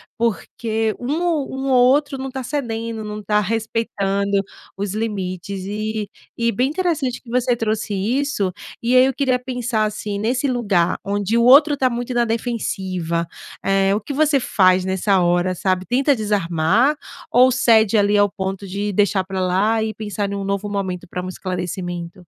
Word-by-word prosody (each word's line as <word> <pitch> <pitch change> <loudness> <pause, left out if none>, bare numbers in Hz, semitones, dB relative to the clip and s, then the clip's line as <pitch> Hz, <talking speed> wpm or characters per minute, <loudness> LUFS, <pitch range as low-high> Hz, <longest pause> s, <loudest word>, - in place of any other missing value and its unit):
porque 225 -1 -1
um 275 +6 -2
ou 325 -6 0
um 265 +1 -3
ou 250 -1 +5
outro 285 0 +1
não 265 0 -5
tá 265 0 -5
cedendo, 230 -5 -3
não 210 0 -6
tá 210 +1 +1
respeitando 200 -2 -1 0.4
os 200 -1 -3
limites. 195 -3 -4
E 215 +1 -3 0.3
e 235 0 +1
bem 250 +5 +1
interessante 310 -6 -1
que 240 - -16
você 245 0 +1
trouxe 215 -1 -2
isso. 210 -1 0 0.3
E 240 +2 +1
aí 255 - +8
eu 265 - +1
queria 260 -1 +1
pensar 245 -3 -1
assim, 210 -1 -3
nesse 245 +6 0
lugar 200 -9 +1
onde 205 +2 0
o 235 - +3
outro 290 +4 +7
tá 265 -2 +2
muito 245 +1 -4
na 240 - +2
defensiva, 190 -8 -2 0.4
eh, 195 0 +2
o 210 - +1
que 280 +7 -6
você 295 -1 +3
faz 185 -5 +3
nessa 190 +1 +1
hora 175 +1 +2
sabe, 185 0 0
tenta 270 +3 +2
desarmar 205 - +1 0.4
ou 255 +2 +6
cede 225 -3 +4
ali 205 0 +3
ao 205 0 +4
ponto 195 0 -4
de 200 +2 -3
deixar 200 -1 +2
pra 190 0 -3
lá 205 +5 +1
e 220 0 -2
pensar 205 -2 -4
em - - -3
um 200 - -3
novo 200 +1 -2
momento 190 -3 -3
pra 180 - -4
um 185 - -5
esclarecimento? 175 -1 -5
215 Hz, 175 wpm, -20 LUFS, 195-245 Hz, 0.4 s, aí